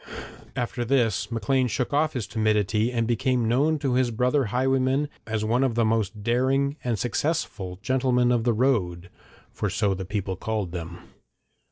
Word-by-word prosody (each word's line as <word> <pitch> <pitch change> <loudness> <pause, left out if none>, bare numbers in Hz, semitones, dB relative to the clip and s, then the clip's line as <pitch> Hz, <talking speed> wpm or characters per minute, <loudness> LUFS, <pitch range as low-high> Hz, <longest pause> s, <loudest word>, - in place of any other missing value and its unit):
After 120 0 -2
this 120 -4 +1
Maclean 125 +3 +1
shook 125 +4 -2
off 155 +1 +2
his 125 -5 -3
timidity, 110 0 +1
and 115 -2 0
became 120 0 +1
known 145 +7 +2
to 140 -4 -1
his 125 -1 +2
brother 125 +4 +1
highwaymen 130 +4 +1 0.2
as 110 -1 -1
one 120 +4 +2
of 130 -4 0
the 115 -1 +2
most 110 -2 -1
daring 135 +4 +1
and 120 -3 0
successful 105 - -2
'gentlemen 125 -1 +2
of 120 -2 +2
the 120 - +2
road,' 90 -8 0 0.4
for - - -2
so 100 -2 +1
the 95 0 -4
people 95 0 -3
called 105 -2 -3
them. 85 -1 -6
120 Hz, 165 wpm, -25 LUFS, 105-130 Hz, 0.4 s, off